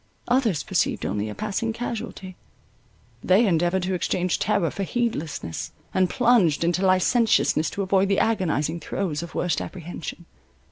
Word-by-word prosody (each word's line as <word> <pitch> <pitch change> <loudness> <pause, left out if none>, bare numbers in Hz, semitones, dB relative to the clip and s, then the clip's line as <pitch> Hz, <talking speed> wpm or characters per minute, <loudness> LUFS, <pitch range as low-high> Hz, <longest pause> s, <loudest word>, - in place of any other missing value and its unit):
Others 240 - +2
perceived - - 0
only 105 +1 -2
a 105 - -6
passing 215 +2 -2
casualty; 220 -5 -5 0.9
they 195 +6 +4
endeavoured 175 0 +1
to 185 +1 -1
exchange 180 0 0
terror 200 -5 +1
for - - -5
heedlessness, 185 - -3 0.2
and 185 -1 +2
plunged 230 - +3
into 175 +3 +1
licentiousness, 185 -3 +3
to 200 - -3
avoid 190 0 +2
the 200 - +2
agonizing 170 -7 0
throes 165 -4 -3
of 170 - -8
worst 180 - 0
apprehension. 175 -1 -7
185 Hz, 140 wpm, -24 LUFS, 170-215 Hz, 0.9 s, they